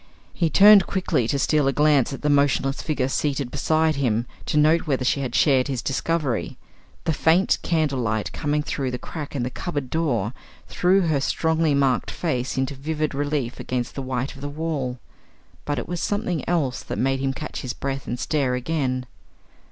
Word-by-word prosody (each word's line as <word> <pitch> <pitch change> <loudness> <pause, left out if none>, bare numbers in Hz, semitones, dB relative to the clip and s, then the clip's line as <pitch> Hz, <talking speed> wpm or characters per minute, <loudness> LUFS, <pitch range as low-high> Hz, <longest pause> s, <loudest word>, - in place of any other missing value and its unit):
He 170 -3 +1
turned 200 +1 +7
quickly 180 - 0
to 140 - 0
steal 145 +1 +2
a - - +3
glance 145 -2 +3
at 135 - -7
the 150 - +2
motionless 140 -1 +2
figure 140 -5 -1
seated 135 -2 -1
beside 155 +1 +1
him, 120 -4 +1 0.2
to - - 0
note 155 +3 +4
whether 135 -3 0
she 140 - +2
had 130 -3 -3
shared 135 -4 +4
his 130 -4 -3
discovery. 140 -3 -1 0.5
The 160 - 0
faint 165 +5 +3
candle 155 -6 0
light 110 -3 -1
coming 150 -1 -1
through 135 -3 -2
the 125 - -3
crack 150 +3 -7
in 130 - -1
the 125 - -3
cupboard 145 -5 -4
door, 125 -9 0 0.3
threw 185 +2 +3
her 155 -6 +1
strongly 160 +1 +1
marked 135 -3 +1
face 130 -8 -2
into 130 +1 0
vivid 155 +2 -2
relief 145 -3 -2
against 125 -1 -3
the 135 - -4
white 130 0 -3
of 135 - -12
the 145 - -4
wall. 145 -5 -3 0.7
But 145 -1 -1
it - - -4
was 175 0 -3
something 180 -7 -1
else 150 -8 0
that - - -5
made 135 +1 +1
him 135 0 0
catch 150 +3 -6
his 130 -3 -4
breath 135 0 -4
and 120 - -3
stare 135 -4 0
again. 130 -2 -1
140 Hz, 190 wpm, -23 LUFS, 130-155 Hz, 0.7 s, turned